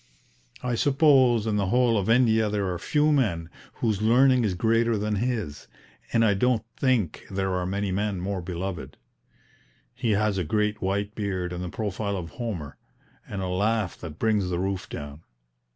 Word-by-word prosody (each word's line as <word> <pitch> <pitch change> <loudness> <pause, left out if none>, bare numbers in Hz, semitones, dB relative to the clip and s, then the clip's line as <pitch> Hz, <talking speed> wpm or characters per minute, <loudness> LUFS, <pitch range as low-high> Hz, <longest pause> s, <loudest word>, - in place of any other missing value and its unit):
I 125 -1 -1
suppose 130 -3 +4
in 110 -2 0
the 100 -2 0
whole 120 +2 +3
of 100 0 0
India 110 -2 +4
there 100 -3 -1
are 85 - -5
few 150 0 +2
men 90 - 0 0.2
whose 110 -3 -1
learning 125 +3 +4
is 100 -4 0
greater 115 +3 +2
than 105 0 -1
his, 110 -9 -3 0.4
and 115 -1 +3
I 105 - +4
don't 115 +3 +1
think 125 - 0
there 95 -1 -1
are 90 -1 -1
many 100 +1 -2
men 100 0 -1
more 95 +1 -3
beloved. 90 0 -5 1.0
He 120 -3 0
has 105 -1 +1
a - - 0
great 105 +6 0
white 100 +2 -1
beard 95 -4 -3
and 90 +1 -4
the 90 - -4
profile 100 0 -3
of 85 -3 -6
Homer, 85 - -5 0.5
and 100 -2 -4
a - - -2
laugh 100 +1 0
that 80 -3 -8
brings 105 -3 +1
the 90 - -1
roof 95 +1 -2
down. 75 +1 -7
105 Hz, 175 wpm, -26 LUFS, 95-115 Hz, 1.0 s, suppose